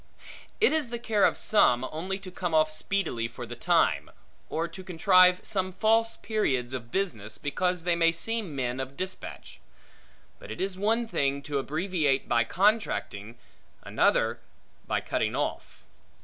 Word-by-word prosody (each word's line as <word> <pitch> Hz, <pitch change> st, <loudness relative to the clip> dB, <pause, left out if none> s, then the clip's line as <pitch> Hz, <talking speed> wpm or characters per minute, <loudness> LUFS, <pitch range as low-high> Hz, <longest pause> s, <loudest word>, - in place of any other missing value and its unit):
It 440 Hz, -, +4 dB
is 310 Hz, -6 st, 0 dB
the 235 Hz, -, -3 dB
care 220 Hz, -3 st, +2 dB
of -, -, +2 dB
some, 125 Hz, -, +4 dB
only 185 Hz, +5 st, -3 dB
to 195 Hz, -2 st, -10 dB
come 175 Hz, -2 st, -2 dB
off 155 Hz, 0 st, +3 dB
speedily 155 Hz, -8 st, -1 dB
for 120 Hz, +1 st, -8 dB
the 120 Hz, +1 st, -8 dB
time; -, -, +2 dB, 0.4 s
or 165 Hz, +1 st, -1 dB
to 185 Hz, +3 st, -10 dB
contrive 180 Hz, +1 st, +4 dB
some 185 Hz, -2 st, -1 dB
false 225 Hz, +3 st, +2 dB
periods 130 Hz, -, -1 dB
of 120 Hz, -3 st, -6 dB
business, 115 Hz, -, -2 dB
because 180 Hz, +4 st, -1 dB
they 175 Hz, 0 st, +1 dB
may 165 Hz, -1 st, +4 dB
seem 200 Hz, -1 st, -1 dB
men 125 Hz, -1 st, -2 dB
of 135 Hz, +1 st, -6 dB
dispatch. 185 Hz, 0 st, -7 dB, 0.8 s
But -, -, -12 dB
it -, -, -7 dB
is 190 Hz, 0 st, -2 dB
one 225 Hz, +4 st, 0 dB
thing, 140 Hz, -8 st, -1 dB
to 140 Hz, -1 st, -2 dB
abbreviate 155 Hz, -1 st, 0 dB
by 120 Hz, -1 st, +2 dB
contracting, 170 Hz, -, 0 dB, 0.5 s
another -, -, +1 dB, 0.5 s
by -, -, 0 dB
cutting -, -, -1 dB
off. -, -, -4 dB
175 Hz, 155 wpm, -27 LUFS, 135-195 Hz, 0.8 s, It